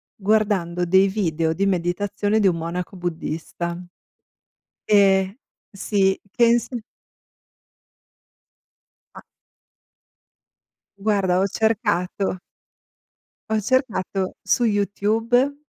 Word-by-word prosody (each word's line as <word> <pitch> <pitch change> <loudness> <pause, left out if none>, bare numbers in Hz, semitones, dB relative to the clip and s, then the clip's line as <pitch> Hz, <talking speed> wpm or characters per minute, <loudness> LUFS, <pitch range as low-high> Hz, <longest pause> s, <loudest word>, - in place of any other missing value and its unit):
guardando 195 -4 +1
dei 190 +3 +4
video 165 -5 0
di 195 +4 0
meditazione 205 +3 0
di 200 - +4
un 170 -2 +1
monaco 175 +3 -5
buddista. 170 0 -4 1.1
Ehm, 195 -1 +3 0.4
sì, 195 -1 +1
penso 235 +2 +2 2.4
A - - -10 1.8
Guarda, 195 -3 +1
ho 195 - +2
cercato 200 -4 -1 1.1
ho 220 -1 +1
cercato 210 -6 -1
su 245 - +1
YouTube: 225 +7 +1
195 Hz, 75 wpm, -22 LUFS, 180-215 Hz, 2.4 s, dei